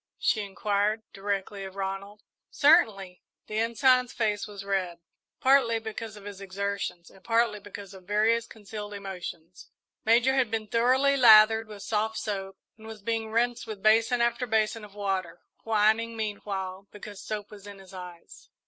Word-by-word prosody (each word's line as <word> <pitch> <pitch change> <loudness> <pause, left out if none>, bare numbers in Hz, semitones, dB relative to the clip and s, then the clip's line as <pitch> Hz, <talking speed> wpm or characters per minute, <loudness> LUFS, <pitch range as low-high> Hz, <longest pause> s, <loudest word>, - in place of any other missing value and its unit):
she 215 - +1
inquired, 205 +2 -1
directly, 195 0 -3
of 190 0 -8
Ronald. 195 +1 -5 0.3
"Certainly." 215 - +3 0.2
The 215 0 -3
Ensign's 245 +2 +3
face 215 -3 -1
was 200 -1 -9
red, 185 -3 -1 0.4
partly 260 -4 +4
because 220 -1 -6
of 205 - -12
his 200 -1 -9
exertions 195 -2 -4
and 190 - -19
partly 230 -2 +1
because 200 0 -10
of 190 -1 -13
various 220 +3 +2
concealed 210 -1 -8
emotions. 180 -3 -8 0.3
Major 235 +4 +4
had 260 -4 +2
been 220 -1 -2
thoroughly 255 +5 +3
lathered 220 -3 +7
with 210 -2 -10
soft 220 0 -1
soap, 195 -2 -4 0.2
and 220 - -12
was 220 -2 -10
being 225 0 -2
rinsed 235 +1 0
with 210 -3 -7
basin 225 +3 +4
after 235 +1 +1
basin 220 0 0
of 205 -1 -13
water, 190 -4 -3 0.2
whining, 225 +1 +2
meanwhile, 200 -3 -4
because 205 -1 -10
soap 210 -1 -5
was 205 -1 -12
in 200 -1 -9
his 195 -1 -15
eyes. 180 -2 -11
210 Hz, 155 wpm, -27 LUFS, 195-225 Hz, 0.4 s, lathered